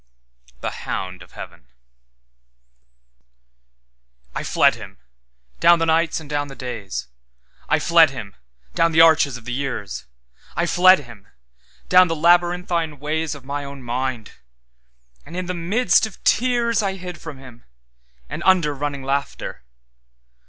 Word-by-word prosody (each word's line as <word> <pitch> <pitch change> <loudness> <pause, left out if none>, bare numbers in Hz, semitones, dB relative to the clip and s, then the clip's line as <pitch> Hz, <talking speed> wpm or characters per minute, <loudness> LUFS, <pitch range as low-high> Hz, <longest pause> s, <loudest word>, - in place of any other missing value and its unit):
The - - -5
Hound 95 -1 -4
of 90 - -15
Heaven - - -11 2.7
I - - -3
FLED - - +3
Him, - - -11 0.6
down 175 - +6
the 165 - 0
nights 165 0 +1
and 160 - -11
down 145 0 -2
the 135 - -10
days;I 65 - -6
fled 165 -2 +5
Him, 115 -7 -8 0.4
down 165 -1 +2
the 160 - +6
arches 155 -5 +5
of 115 - -15
the 125 - -4
years;I 95 - -5
fled 185 0 +5
Him, 115 -7 -14 0.6
down 185 0 +6
the 165 - -2
labyrinthine 175 -1 +2
waysOf 150 0 -3
my 145 +2 -4
own 140 -1 -9
mind; 125 -2 -3 0.9
and 170 +4 -9
in 185 - -3
the 180 - -3
mist 185 +4 +2
of 215 - -14
tearsI 235 -5 +1
hid 180 -3 -8
from 160 -4 -8
Him, 125 -3 -15 0.6
and - - -6
under 175 -6 +3
running 140 -1 -4
laughter. 140 +1 -3
145 Hz, 130 wpm, -21 LUFS, 125-175 Hz, 2.7 s, down